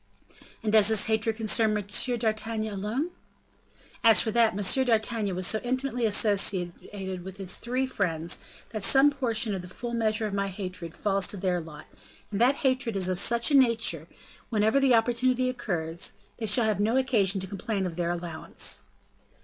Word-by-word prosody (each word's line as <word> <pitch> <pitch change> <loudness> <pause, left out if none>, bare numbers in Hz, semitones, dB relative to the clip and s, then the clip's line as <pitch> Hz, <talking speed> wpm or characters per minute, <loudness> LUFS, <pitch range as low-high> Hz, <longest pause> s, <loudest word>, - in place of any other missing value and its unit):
"And 215 - 0
does 215 -2 +6
this 220 -2 +4
hatred 220 0 +1
concern 220 -1 +1
M. 205 - -5 0.3
d'Artagnan 220 -1 -2
alone?" 220 - -3 0.9
"As 225 -4 +7
for 220 - +1
that, 230 -3 +2
M. 205 +6 +2
d'Artagnan 220 -4 0
was 185 0 -1
so 220 - +2
intimately 250 -1 -1
associated 190 -2 -1
with 190 +1 -9
his 190 -2 0
three 255 +2 -2
friends, 170 -9 -2 0.3
that 215 -2 -4
some 270 +8 +5
portion 230 -6 0
of 190 - -4
the 180 - -10
full 235 +6 -7
measure 220 -1 0
of 210 - -4
my 200 0 -1
hatred 185 -3 -6
falls 195 -2 0
to 205 - -2
their 180 -2 -1
lot, 160 -2 -11 0.5
and 205 +1 -2
that 255 +3 +4
hatred 255 -4 +1
is 185 -1 0
of 185 -1 +2
such 235 +7 +3
a - - +4
nature, 225 - +3 0.4
whenever 220 +4 +2
the 270 -3 +4
opportunity 250 +2 +1
occurs, 170 -8 -3 0.2
they 225 - -4
shall 220 +3 +5
have 215 -2 0
no 220 +5 +1
occasion 215 -8 +2
to 190 - -1
complain 200 +1 -3
of 175 -3 -5
their 170 0 -2
allowance." 170 -2 -4
215 Hz, 175 wpm, -27 LUFS, 190-235 Hz, 0.9 s, As